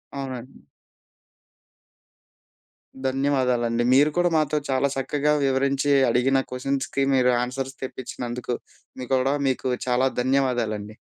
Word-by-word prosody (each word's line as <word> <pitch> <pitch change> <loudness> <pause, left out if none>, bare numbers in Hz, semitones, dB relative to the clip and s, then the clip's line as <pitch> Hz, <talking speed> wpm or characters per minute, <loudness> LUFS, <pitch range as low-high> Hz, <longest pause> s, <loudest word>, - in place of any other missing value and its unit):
అవునండి. 130 -2 -7 2.5
ధన్యవాదాలండి. 125 -3 +1
మీరు 145 +3 +5
కూడా 175 0 +3
మాతో 155 -1 +1
చాలా 135 +1 +2
చక్కగా 145 +2 0
వివరించి 135 +1 +1 0.2
అడిగిన 125 +3 +2
క్వషన్స్‌కి 135 +1 -1
మీరు 125 -1 +4
ఆన్సర్స్ 135 +2 -4
తెప్పించినందుకు. 125 -1 -5 0.5
మీకూడా 130 +2 +1
మీకు 130 0 -1 0.2
చాలా 125 +1 +2
ధన్యవాదాలండి. 120 -5 0
130 Hz, 90 wpm, -24 LUFS, 125-135 Hz, 2.5 s, మీరు